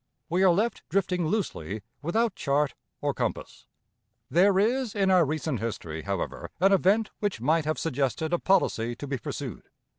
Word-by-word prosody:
We 180 +3 +1
are 190 - +6
left 210 +6 +1
drifting 180 -3 +1
loosely, 110 - -2 0.2
without 220 +8 +1
chart 140 -3 0 0.3
or - - 0
compass. - - -4 0.6
There 190 +6 +5
is 235 +3 +1
in 195 -2 +2
our 180 -2 +6
recent 155 -3 -2
history, 85 -8 -4
however, 100 -1 -4
an 195 +2 +5
event 200 +4 +3
which 205 - -1
might 155 +6 +2
have 155 +1 0
suggested 155 +2 -1
a 175 - +2
policy 120 -11 +1
to 145 - -7
be 135 -2 -3
pursued. - - -6
170 Hz, 160 wpm, -27 LUFS, 135-195 Hz, 0.6 s, are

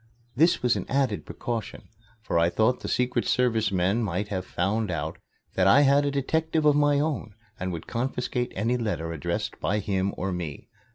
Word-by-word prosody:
This 165 +3 +3
was 125 0 +3
an - - -4
added 130 -6 0
precaution, 115 -4 -5 0.4
for 85 - +1
I 85 +1 +4
thought 110 +7 +2
the - - -6
Secret 125 -1 +1
Service 115 -4 +2
men 95 +5 +1
might 100 -1 -2
have 95 -3 -3
found 105 +4 -1
out 85 -4 -3 0.3
that 95 0 +3
I 140 +9 +7
had 140 0 +4
a - - +2
detective 155 +3 0
of 150 -1 +5
my 145 -1 +3
own 145 -9 -2 0.2
and 90 0 -2
would 85 -2 -6
confiscate 125 0 -2
any 115 +5 +1
letters 85 -8 -2
addressed 80 - -3
by 105 - 0
him 100 -1 0
or 95 +1 -2
me. 85 -6 -5
110 Hz, 185 wpm, -26 LUFS, 95-135 Hz, 0.4 s, I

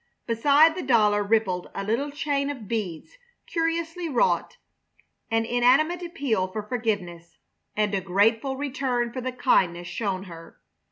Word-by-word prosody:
Beside 285 +7 +4
the 365 - -5
dollar 210 -5 +3
rippled 200 -4 0
a 195 - -3
little 235 +8 -1
chain 285 -1 -1
of 255 -8 -6
beads 210 - -5 0.3
curiously 330 +1 -2
wrought, 280 - +1 0.7
an 225 -1 +1
inanimate 260 +9 +3
appeal 275 - -1
for 210 +3 -5
forgiveness 205 -7 -3 0.4
and 210 -1 0
a 195 - 0
grateful 220 +8 +1
return 255 -4 -2
for 255 - -4
the 255 +1 -3
kindness 180 -9 +1
shown 195 -2 -3
her. 165 -3 -12
235 Hz, 135 wpm, -25 LUFS, 200-280 Hz, 0.7 s, Beside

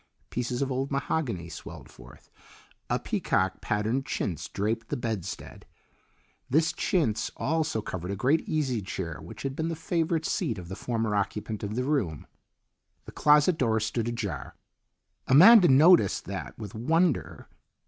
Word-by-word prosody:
Pieces 125 +2 -2
of 135 - -3
old 135 +2 -1
mahogany 135 - -2
swelled 85 -2 -10
forth; 60 0 -16 0.6
a - - +2
peacock 95 0 -1
patterned 110 +6 -1
chintz 80 - -3
draped 110 +3 -2
the - - -2
bedstead. 110 -7 -5 0.9
This 155 +5 +2
chintz 115 - 0
also 155 -7 -1
covered 90 0 -5
a 100 - -2
great 135 +10 +2
easy 135 -8 0
chair 85 -4 -5
which 80 - -10
had 135 -1 -3
been 160 +2 -2
the 165 - -2
favourite 165 0 -1
seat 110 - -1
of 90 -1 -9
the 95 - -5
former 115 -1 -2
occupant 105 +1 -2
of 105 +1 -4
the 125 - 0
room. 120 - -1 0.8
The - - -9
closet 150 +3 +4
door 110 -3 +2
stood 110 +1 -2
ajar. 100 - -4 0.7
Amanda 185 - +8
noticed 145 - +5
that 100 0 -6
with 105 -3 -8
wonder. 160 +7 0
115 Hz, 150 wpm, -27 LUFS, 100-150 Hz, 0.9 s, Amanda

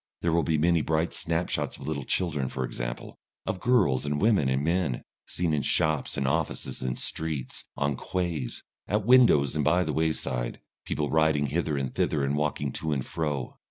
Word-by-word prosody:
There 85 -1 +2
will 85 - +4
be 80 -1 +1
many 85 +2 +3
bright 80 +2 0
snapshots 85 +1 -1
of 65 - -9
little 70 -4 -3
children, 75 -8 0
for 65 -1 -2
example, - - -6 0.3
of 95 -1 -2
girls 100 - +3
and 75 0 -1
women 100 -11 +3
and 65 +2 +1
men, 85 -5 0 0.2
seen 85 -3 -1
in 75 - +1
shops 75 -2 +1
and 70 - 0
offices 65 - -1
and 65 -1 -2
streets, 80 -5 -3
on 70 0 0
quays, 85 -6 -3 0.2
at 105 0 0
windows 115 - +6
and 75 - +1
by 85 +5 +3
the - - -2
wayside, 80 -6 -1 0.3
people 75 -1 -2
riding 80 -2 +3
hither 75 +1 -1
and 65 -2 -2
thither 75 -3 +1
and 70 +1 0
walking 75 -2 -1
to 80 +4 -3
and 65 -3 -2
fro. 75 -6 -3
75 Hz, 185 wpm, -27 LUFS, 70-85 Hz, 0.3 s, windows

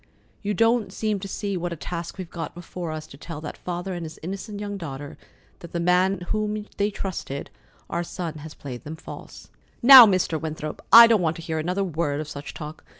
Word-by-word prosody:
You 205 0 -2
don't 225 +2 +2
seem 215 -2 -1
to 195 - -6
see 200 0 -3
what 175 -1 -3
a - - -3
task 170 +2 -6
we've 185 -2 -6
got 165 -2 -6
before 175 -1 -6
us 155 0 -5
to 140 - -14
tell 160 +1 -7
that 150 - -6
father 180 +1 -4
and 175 -1 -5
his 160 -1 -8
innocent 195 +4 -5
young 205 -1 -4
daughter 145 -6 -7 0.4
that 170 - -11
the 170 - -1
man 180 +2 +3
in 180 - -11
whom 210 +3 -2
they 205 +1 +2
trusted, 185 -8 -5 0.4
our 170 - -2
son, 165 -2 -5
has 155 +1 -10
played 125 -4 -8
them 155 +2 -6
false." 160 - -11 0.3
"Now, 255 -2 +12
Mr. 185 -5 +1
Winthrop, 155 -1 -5
I 230 +3 +12
don't 225 -4 +4
want 165 -1 +1
to 165 - -9
hear 160 -1 -2
another 180 +5 -1
word 155 -5 -1
of 155 - -4
such 145 -1 -7
talk. 150 0 -8
175 Hz, 215 wpm, -25 LUFS, 155-200 Hz, 0.4 s, Now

